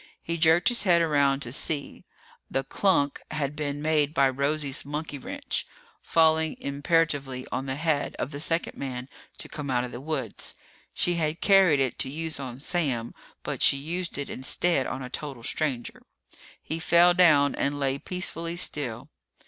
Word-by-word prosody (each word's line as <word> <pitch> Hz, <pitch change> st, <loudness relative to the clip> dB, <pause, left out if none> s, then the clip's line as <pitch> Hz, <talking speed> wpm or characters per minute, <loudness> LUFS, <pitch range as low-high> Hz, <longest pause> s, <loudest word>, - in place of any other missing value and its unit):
He 170 Hz, -, -2 dB
jerked 160 Hz, +2 st, +5 dB
his 240 Hz, -, +1 dB
head 175 Hz, -4 st, +4 dB
around 140 Hz, -4 st, +2 dB
to 120 Hz, -, -4 dB
see. 145 Hz, +1 st, -3 dB, 0.4 s
The 135 Hz, -, -1 dB
klunk 145 Hz, -3 st, +1 dB
had 150 Hz, -2 st, -2 dB
been 145 Hz, -1 st, -3 dB
made 155 Hz, -1 st, +2 dB
by 135 Hz, -1 st, +5 dB
Rosie's 140 Hz, +1 st, -1 dB
monkey 145 Hz, 0 st, -5 dB
wrench, -, -, -4 dB, 0.3 s
falling 160 Hz, -1 st, +3 dB
imperatively 140 Hz, -3 st, 0 dB
on 135 Hz, -, -2 dB
the 130 Hz, -, -2 dB
head 155 Hz, 0 st, 0 dB
of 140 Hz, -, -3 dB
the 145 Hz, -, -6 dB
second 165 Hz, +2 st, -1 dB
man 130 Hz, -2 st, -5 dB, 0.3 s
to -, -, -8 dB
come 145 Hz, -2 st, -6 dB
out 125 Hz, -1 st, +1 dB
of 125 Hz, -, -5 dB
the 120 Hz, -, -7 dB
woods. 140 Hz, -7 st, -4 dB, 0.4 s
She 175 Hz, -1 st, +1 dB
had 155 Hz, 0 st, -1 dB
carried 190 Hz, -7 st, +5 dB
it 130 Hz, -2 st, 0 dB
to 130 Hz, -, -1 dB
use 160 Hz, +1 st, -4 dB
on 130 Hz, -2 st, -6 dB
Sam, 140 Hz, -9 st, -1 dB, 0.3 s
but -, -, -4 dB
she 140 Hz, -, +5 dB
used 170 Hz, +5 st, -3 dB
it 140 Hz, -, -3 dB
instead 135 Hz, +2 st, +1 dB
on 130 Hz, -, -4 dB
a -, -, -5 dB
total 135 Hz, -6 st, -5 dB
stranger. 130 Hz, -3 st, -1 dB, 0.6 s
He 160 Hz, +2 st, -3 dB
fell 175 Hz, +1 st, +5 dB
down 155 Hz, -6 st, +5 dB
and 145 Hz, +1 st, -1 dB
lay 135 Hz, 0 st, 0 dB
peacefully 170 Hz, -1 st, -2 dB
still. 130 Hz, -7 st, -3 dB
145 Hz, 170 wpm, -27 LUFS, 135-165 Hz, 0.6 s, jerked